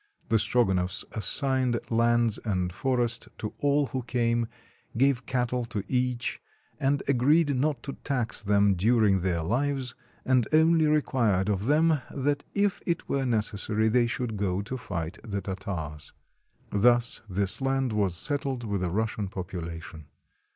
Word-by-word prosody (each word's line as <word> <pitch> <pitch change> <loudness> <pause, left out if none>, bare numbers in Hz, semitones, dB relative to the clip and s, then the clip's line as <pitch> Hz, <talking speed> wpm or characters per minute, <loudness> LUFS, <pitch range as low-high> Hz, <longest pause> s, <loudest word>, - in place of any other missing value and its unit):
The 115 - +4
Strogonoffs 95 -7 +1
assigned 130 +1 +1
lands 115 -1 +2
and 90 -5 -1
forest 120 +1 0
to 105 - -5
all 145 0 +2
who 130 +1 -3
came, 115 -1 0 0.5
gave 130 -1 +2
cattle 125 -1 0
to 110 -4 -4
each, 125 -1 -1 0.4
and 140 +1 +1
agreed 140 +3 +3
not 135 -1 0
to 140 - -5
tax 125 -7 -1
them 100 -1 +3
during 105 +1 +3
their 90 -2 0
Uves, 130 - -1 0.3
and 130 -3 +3
only 160 0 +5
required 115 -10 +2
of 100 +1 -1
them 155 0 +3
that 145 +1 -1
if 200 -1 +1
it 170 -2 -1
were 135 -1 0
necessary 110 -1 0
they 120 +1 +3
should 120 -2 -3
go 100 -1 -1
to 120 +5 -5
fight 85 -9 -5
the 100 -3 -3
Tartars. 95 -6 -6 0.6
Thus 120 +3 +3
this 95 +5 -1
land 135 -2 0
was 100 -5 0
settled 135 - -2
with 100 -4 -2
a 90 - 0
Russian 105 +1 -1
population. 85 -4 -7
115 Hz, 145 wpm, -27 LUFS, 100-135 Hz, 0.6 s, only